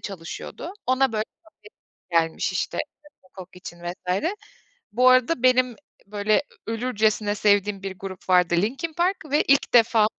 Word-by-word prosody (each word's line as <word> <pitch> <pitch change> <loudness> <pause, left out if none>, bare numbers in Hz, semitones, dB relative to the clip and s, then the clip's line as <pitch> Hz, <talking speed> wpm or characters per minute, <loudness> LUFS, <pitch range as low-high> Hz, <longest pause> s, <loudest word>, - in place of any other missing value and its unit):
çalışıyordu. 195 - -7
Ona, 260 -1 +2
böyle, 215 0 -1 0.9
davetiye 165 -1 +4
gelmiş, 160 - -3
işte, - - -3 0.4
Rock'n 185 - -27
Coke 180 0 -11
için 175 -1 -10
vs. 180 - -3 0.7
Bu 250 +3 +4
arada 255 +1 +3
benim, 255 -1 +3 0.3
böyle, 210 +3 +1 0.2
ölürcesine 220 -2 0
sevdiğim 205 -1 +1
bir 190 -1 -6
grup 190 -1 -9
vardı 180 -1 +4
"Linkin 265 - -1
Park" 355 +4 +1
ve 295 - +3
ilk 275 -2 +2
defa 225 -2 +5
215 Hz, 140 wpm, -24 LUFS, 190-255 Hz, 0.9 s, defa